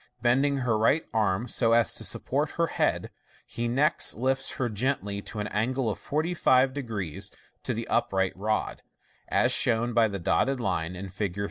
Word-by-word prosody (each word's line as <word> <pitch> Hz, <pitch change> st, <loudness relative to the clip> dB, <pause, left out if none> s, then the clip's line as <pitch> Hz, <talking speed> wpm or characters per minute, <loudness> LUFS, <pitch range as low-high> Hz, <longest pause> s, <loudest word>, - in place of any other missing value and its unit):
Bending 135 Hz, +4 st, +2 dB
her 115 Hz, -3 st, +1 dB
right 140 Hz, +8 st, +2 dB
arm 110 Hz, 0 st, 0 dB
so 115 Hz, -2 st, +2 dB
as 115 Hz, 0 st, +4 dB
to -, -, -3 dB
support -, -, -1 dB
her -, -, +3 dB
head, -, -, -1 dB, 0.3 s
he 120 Hz, 0 st, -4 dB
next 140 Hz, +7 st, +2 dB
lifts 135 Hz, +2 st, 0 dB
her 125 Hz, -, -1 dB
gently 105 Hz, -3 st, -2 dB
to 110 Hz, -, -7 dB
an 105 Hz, -, -2 dB
angle 120 Hz, +3 st, -1 dB
of -, -, -7 dB
450 145 Hz, -4 st, +1 dB, 0.8 s
to -, -, -2 dB
the -, -, -4 dB
upright 95 Hz, -1 st, 0 dB
rod 110 Hz, +3 st, -2 dB, 0.5 s
(as -, -, +2 dB
shown 120 Hz, +1 st, +4 dB
by 115 Hz, -1 st, +4 dB
the 100 Hz, -2 st, -4 dB
dotted 125 Hz, +9 st, 0 dB
line 90 Hz, -5 st, -2 dB
in 95 Hz, +1 st, -7 dB
Fig. 95 Hz, 0 st, -4 dB
115 Hz, 165 wpm, -27 LUFS, 100-130 Hz, 0.8 s, as